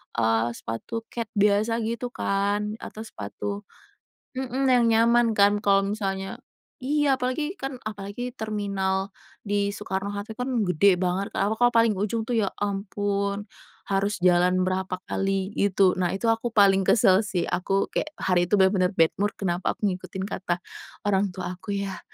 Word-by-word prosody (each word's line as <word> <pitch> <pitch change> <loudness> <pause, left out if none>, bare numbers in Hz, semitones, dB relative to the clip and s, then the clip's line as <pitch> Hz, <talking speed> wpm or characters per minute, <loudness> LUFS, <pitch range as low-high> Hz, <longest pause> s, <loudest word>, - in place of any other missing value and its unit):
eee, 115 0 +2
sepatu 225 - -5
kets 230 -2 -4
biasa 210 +3 +2
gitu 235 +2 -2
kan 205 0 -1
atau 220 - -8
sepatu 200 - -6 0.7
mhm, 265 +1 -1
yang 245 -2 +5
nyaman 230 +1 +4
kan 205 +1 +5
kalau 195 -1 +3
misalnya 195 -2 -3 0.4
iya, 280 0 +1
apalagi 295 +8 -2
kan 270 0 -4
apalagi 215 +4 -5
terminal 200 -4 -2 0.3
di 205 -1 0
Soekarno 200 0 -3
Hatta 205 +2 -5
kan 250 +3 -4 0.2
gede 180 +1 +4
banget, 185 +2 -1
apalagi 220 +4 +2
kalau 240 - -2
paling 230 -1 +5
ujung 220 +2 -1
tuh 230 0 0
ya 200 - +1
ampun 200 0 -2 0.5
harus 200 +1 +1
jalan 180 +1 +4
berapa 185 0 -2
kali 195 0 -1
gitu. 195 -2 +3
Nah 180 0 +1
itu 225 +4 0
aku 230 +1 -2
paling 195 -2 +5
kesel 190 -4 +5
sih, 180 -5 -1
aku 195 +2 -1
kayak 310 - -3
hari 175 -2 +1
itu 210 - +3
bener-bener 190 -1 +3
bad 165 -2 +4
mood 205 0 +1
kenapa 180 -2 -1
aku 205 - 0
ngikutin 185 +1 -6
kata 180 -3 -3 0.4
orang 200 -1 +2
tua 180 -2 -4
aku 205 +1 -4
ya, 195 -1 -3
200 Hz, 155 wpm, -25 LUFS, 190-220 Hz, 0.7 s, yang